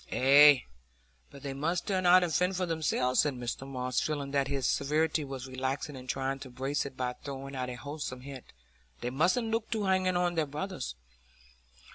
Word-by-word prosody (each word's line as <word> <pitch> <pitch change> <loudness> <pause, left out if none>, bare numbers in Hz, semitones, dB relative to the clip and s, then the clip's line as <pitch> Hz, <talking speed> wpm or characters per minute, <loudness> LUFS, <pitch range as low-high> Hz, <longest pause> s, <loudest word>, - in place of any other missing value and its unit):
"Ah, 145 +3 +8 0.7
but 140 -1 -13
they 140 -1 -4
must 165 +6 -1
turn 185 -3 0
out 180 +1 +7
and 170 -3 -1
fend 180 +1 +2
for 180 0 0
themselves," 155 -6 0
said 145 -3 +3
Mr 120 -1 -4
Tulliver, 130 -2 -5
feeling 140 +1 -1
that 140 -1 +1
his 135 -2 -2
severity 155 +2 +1
was 135 -2 -6
relaxing 135 +3 -3
and 130 0 -10
trying 135 0 -1
to 135 - -9
brace 135 +3 -2
it 135 - -12
by 125 -1 -1
throwing 135 0 -6
out 125 -1 -3
a 125 - -5
wholesome 140 -1 -6
hint 135 -1 -9 0.6
"They 120 - -2
mustn't 185 - +1
look 225 0 -1
to 220 -3 -1
hanging 185 -1 +2
on 175 0 +1
their 160 -3 0
brothers." 145 - -5
140 Hz, 190 wpm, -30 LUFS, 130-170 Hz, 0.7 s, Ah